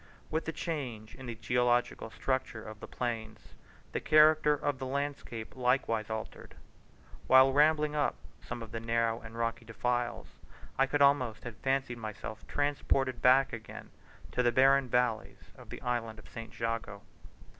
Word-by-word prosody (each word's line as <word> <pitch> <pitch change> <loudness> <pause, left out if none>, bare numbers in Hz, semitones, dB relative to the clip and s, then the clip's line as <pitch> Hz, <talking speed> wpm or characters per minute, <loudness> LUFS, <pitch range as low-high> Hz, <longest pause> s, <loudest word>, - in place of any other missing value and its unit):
With 160 +1 -1
the 160 - -2
change 135 -10 -5
in 130 -1 -10
the 120 - -4
geological 120 0 +1
structure 120 +2 -2
of 110 -1 -9
the - - -8
plains 110 -3 -5 0.4
the - - -1
character 155 -1 +5
of 145 -2 -2
the 130 - -4
landscape 140 -5 -4
likewise 125 -4 +1
altered. 110 0 -6 0.7
While 130 +1 +7
rambling 150 +1 +3
up 150 - +1 0.3
some 120 - -6
of 110 - -11
the 115 - -4
narrow 115 0 0
and 115 0 -10
rocky 115 0 -2
defiles, 120 +1 -3 0.4
I 135 - +3
could 145 +1 +3
almost 130 -6 +3
have 120 -3 -7
fancied 135 -2 -1
myself 110 0 -7
transported 135 -3 0
back 130 +1 +5
again 110 -1 -8 0.4
to - - +1
the 120 -1 +3
barren 135 +1 +4
valleys 125 -2 -1
of - - -15
the - - -8
island 115 -3 -2
of 110 - -14
St. 115 0 -10
Jago. 115 -3 -3
125 Hz, 155 wpm, -31 LUFS, 115-135 Hz, 0.7 s, While